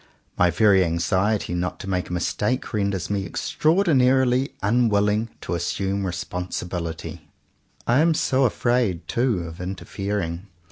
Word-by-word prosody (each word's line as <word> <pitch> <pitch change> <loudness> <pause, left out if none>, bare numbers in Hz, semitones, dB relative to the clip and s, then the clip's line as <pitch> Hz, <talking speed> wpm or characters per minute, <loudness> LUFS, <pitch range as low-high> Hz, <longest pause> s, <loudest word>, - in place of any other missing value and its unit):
My 90 - +4
very 95 +1 +4
anxiety 95 +4 0
not 90 +1 -2
to - - -8
make 90 -2 -2
a - - -4
mistake 105 +9 -1
renders 100 -3 -1
me 100 -1 0
extraordinarily 135 - +2
unwilling 105 0 +2
to - - -4
assume 95 +3 -1
re - - -1
sponsibility. 90 -1 -5 0.6
I 120 +3 +3
am 165 +1 +4
so 135 -2 +2
afraid, 115 -8 0
too, 120 -7 0
of 85 +1 -8
interfering. 95 -1 -4
100 Hz, 130 wpm, -23 LUFS, 90-120 Hz, 0.6 s, My